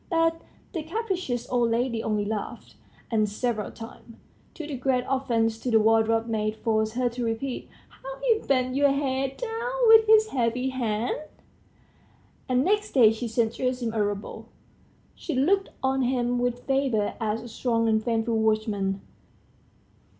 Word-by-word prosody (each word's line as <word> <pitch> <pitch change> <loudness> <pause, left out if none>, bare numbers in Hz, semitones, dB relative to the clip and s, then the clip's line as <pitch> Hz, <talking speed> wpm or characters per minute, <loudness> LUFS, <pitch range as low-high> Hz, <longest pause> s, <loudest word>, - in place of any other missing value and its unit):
But 330 -1 +1 0.3
the 335 - -2
capricious 360 - -3
old 240 -2 +2
lady 230 0 0
only 210 -2 0
laughed, 210 0 -5 0.4
and 215 -2 +2
several 215 0 -2
times, 230 0 -11 0.4
to 315 - -6
the 295 -2 -5
great 255 0 0
offence 230 -4 0
of 250 - -1
the 225 - +6
wardrobe 225 +1 +3
maid, 215 -2 -1
forced 220 -1 0
her 250 0 +1
to 240 +1 -5
repeat 230 +3 -3 0.2
"how - - -10
he 480 -3 +2
bent 255 - 0
your 285 +1 +4
head 270 -1 -1
down 470 0 -3 0.2
with 445 -1 +8
his 435 0 +6
heavy 250 - 0
hand," 235 -3 -2 1.3
and 255 0 +3
next 420 +1 +1
day 230 -5 +6
she 225 +2 -4
sent 225 0 0
Gerasim 250 -3 -2
a 215 -2 +1
rouble. 205 0 -5 0.7
She 320 - -5
looked 385 +9 +2
on 265 0 +1
him 245 -1 0
with 245 0 -2
favor 265 -6 +1
as 220 +1 -1
a - - -8
strong 230 -1 0
and 220 -1 +2
faithful 225 -1 0
watchman. 215 -3 0
245 Hz, 155 wpm, -26 LUFS, 225-270 Hz, 1.3 s, with